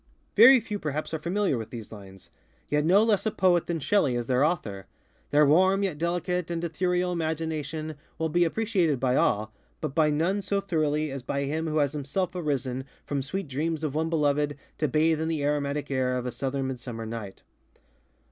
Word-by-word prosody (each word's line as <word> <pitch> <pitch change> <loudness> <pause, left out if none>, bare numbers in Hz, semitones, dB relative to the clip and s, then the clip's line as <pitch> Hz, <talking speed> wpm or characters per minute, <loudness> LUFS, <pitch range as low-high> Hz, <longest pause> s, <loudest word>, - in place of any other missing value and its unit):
Very 255 +5 +9
few 210 -2 -5
perhaps 155 0 -3
are 160 - -1
familiar 175 - 0
with 110 - -6
these 115 -3 -8
linesŌĆöyet 100 +8 -6
no 195 +6 +5
less 220 -1 +2
a - - +4
poet 180 -4 +2
than 170 -1 -1
Shelley 145 -5 +2
is 120 -1 -2
their 125 +2 +2
author. 105 - -1 0.4
Their 150 +1 +5
warm, 185 +7 +4
yet 180 -7 -2
delicate 175 +1 -1
and 170 0 -3
ethereal 180 +2 0
imagination 160 -2 -3 0.2
will 160 - 0
be 175 +3 +2
appreciated 175 - +1
by 125 0 +1
all, 110 -1 +1 0.3
but 155 -3 -4
by 155 0 +3
none 170 +7 +1
so 200 0 0
thoroughly 155 -5 0
as 135 -1 -5
by 140 +3 -2
him 155 +4 -2
who 155 0 -1
has 145 -1 +2
himself 150 +6 -2
arisen 135 -6 -2 0.2
from 140 -1 -2
sweet 155 +7 -4
dreams 155 +4 -2
of 150 -3 -1
one 160 +2 0
beloved 145 -2 +1 0.2
to 155 - +2
bathe 155 +3 +2
in 160 - -1
the 160 -3 -1
aromatic 145 0 -1
air 130 -1 +1
of 125 - -4
a 125 - -2
southern 135 +1 -2
midsummer 120 -3 -6
night. 110 -3 -7
155 Hz, 190 wpm, -27 LUFS, 135-175 Hz, 0.4 s, Very